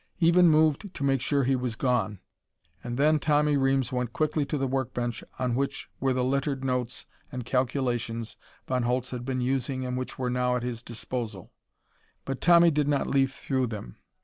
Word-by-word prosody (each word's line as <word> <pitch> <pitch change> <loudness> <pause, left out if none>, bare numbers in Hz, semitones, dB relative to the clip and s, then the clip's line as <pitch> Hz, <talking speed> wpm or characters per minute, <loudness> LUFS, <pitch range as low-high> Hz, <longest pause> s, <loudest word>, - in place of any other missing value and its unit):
Even 170 0 +6
moved 155 +4 +3
to 140 - -4
make 135 -2 +2
sure 140 +1 +1
he 130 +1 +2
was 125 -3 -2
gone. 115 -5 0 0.7
And 120 0 -4
then 150 +2 +4
Tommy 150 0 +2
Reames 135 -1 +2
went 125 -2 -2
quickly 155 -1 0
to 150 - -2
the 135 - 0
work 130 -2 -2
bench 120 -1 -2
on 125 -2 0
which 140 +3 -2
were 135 0 +1
the 130 -1 +1
littered 135 +1 0
notes 125 -1 -2 0.3
and 125 -3 -5
calculations 120 -3 -1 0.3
Von 130 -1 0
Holtz 125 +1 -1
had 125 -1 -5
been 130 -1 -1
using 130 0 -1
and 125 0 -2
which 130 0 -4
were 125 -1 -1
now 125 0 +1
at 125 - -2
his 120 -2 -4
disposal. 115 -4 -6 0.7
But 135 -1 -4
Tommy 170 -1 +6
did 150 -1 +1
not 145 -2 +1
leaf 135 -1 +1
through 130 -2 -1
them. 105 - -7
130 Hz, 190 wpm, -27 LUFS, 125-140 Hz, 0.7 s, Even